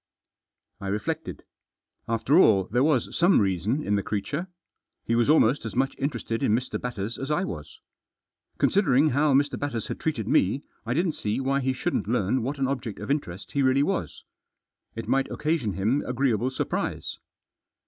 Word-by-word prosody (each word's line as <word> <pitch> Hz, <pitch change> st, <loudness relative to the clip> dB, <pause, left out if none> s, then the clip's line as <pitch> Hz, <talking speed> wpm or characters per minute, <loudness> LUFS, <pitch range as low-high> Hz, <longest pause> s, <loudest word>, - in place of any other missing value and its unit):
I 100 Hz, -, -6 dB
reflected. 155 Hz, +11 st, -3 dB, 0.6 s
After 115 Hz, +8 st, +3 dB
all 95 Hz, -, +5 dB
there 125 Hz, +3 st, +3 dB
was 145 Hz, -6 st, +1 dB
some 175 Hz, +2 st, +5 dB
reason 100 Hz, -, 0 dB
in 105 Hz, -, 0 dB
the -, -, 0 dB
creature. 140 Hz, -, -3 dB, 0.6 s
He 115 Hz, -, 0 dB
was 120 Hz, +3 st, +2 dB
almost 145 Hz, -3 st, +4 dB
as 115 Hz, -, -6 dB
much 135 Hz, +2 st, +1 dB
interested 120 Hz, -5 st, -2 dB
in 105 Hz, -, +3 dB
Mr. 125 Hz, +2 st, -3 dB
Batters 115 Hz, -2 st, -4 dB
as 135 Hz, -, -4 dB
I 155 Hz, +4 st, +1 dB
was. 75 Hz, -, -7 dB, 0.8 s
Considering 155 Hz, -7 st, +3 dB
how 145 Hz, +1 st, +3 dB
Mr. 145 Hz, +1 st, +2 dB
Batters 130 Hz, -6 st, -3 dB
had -, -, -4 dB
treated 120 Hz, -10 st, -2 dB
me 120 Hz, +10 st, +2 dB, 0.2 s
I 120 Hz, -, 0 dB
didn't 170 Hz, +2 st, +2 dB
see 105 Hz, -6 st, -2 dB
why 135 Hz, +1 st, +1 dB
he 130 Hz, -1 st, 0 dB
shouldn't 130 Hz, -, -2 dB
learn 120 Hz, +1 st, +1 dB
what 135 Hz, +5 st, -3 dB
an 135 Hz, -1 st, 0 dB
object 125 Hz, -6 st, -3 dB
of 105 Hz, +5 st, -4 dB
interest 100 Hz, -, -3 dB
he 140 Hz, -, 0 dB
really 135 Hz, +1 st, +3 dB
was. 195 Hz, +4 st, -2 dB, 0.7 s
It 115 Hz, -, -5 dB
might 135 Hz, 0 st, +1 dB
occasion 150 Hz, -, -1 dB
him 110 Hz, +10 st, +1 dB
agreeable 125 Hz, -2 st, +1 dB
surprise. 130 Hz, -, -3 dB
130 Hz, 170 wpm, -26 LUFS, 110-145 Hz, 0.8 s, all